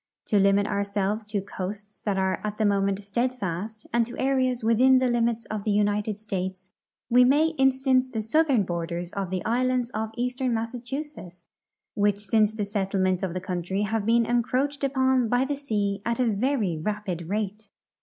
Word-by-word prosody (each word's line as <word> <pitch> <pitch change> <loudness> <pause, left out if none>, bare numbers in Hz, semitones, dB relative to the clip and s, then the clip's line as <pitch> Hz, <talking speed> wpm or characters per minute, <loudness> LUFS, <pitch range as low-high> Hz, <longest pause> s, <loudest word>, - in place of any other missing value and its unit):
To 205 - +2
limit 200 +1 +4
ourselves 200 +1 -1
to 210 -1 -2
coasts 200 +2 -7
that 200 -2 -2
are 190 0 0
at 210 0 -3
the 220 - +1
moment 200 0 +1
steadfast 215 -2 -3
and 235 0 +4
to 245 - -9
areas 260 -2 +1
within 250 +4 +5
the 255 0 +2
limits 235 -1 0
of 215 -2 -3
the 215 - -1
United 205 0 +1
States, 190 -3 -5 0.4
Ave 250 +1 +7
may 295 +5 +4
instance 265 -1 +3
the 225 -4 -3
southern 270 -1 +3
borders 170 0 -4
of 195 -2 -3
the 185 -1 -3
islands 250 +1 +1
of 220 0 -3
eastern 250 0 -1
Massachusetts, 235 - -6 0.5
Avhich 205 -1 +1
since 210 +1 +2
the 215 -2 -3
settlement 190 -2 0
of 185 -3 -3
the - - -1
country 185 +2 -2
have 215 0 -1
been 230 0 +4
encroached 255 +5 0
upon 260 -3 +2
by 245 +3 +2
the 285 +1 -2
sea 210 -8 -2
at 235 +1 -1
a 250 - +3
very 220 -4 0
rapid 185 -3 -3
rate. 210 0 -3
215 Hz, 175 wpm, -26 LUFS, 200-250 Hz, 0.5 s, Ave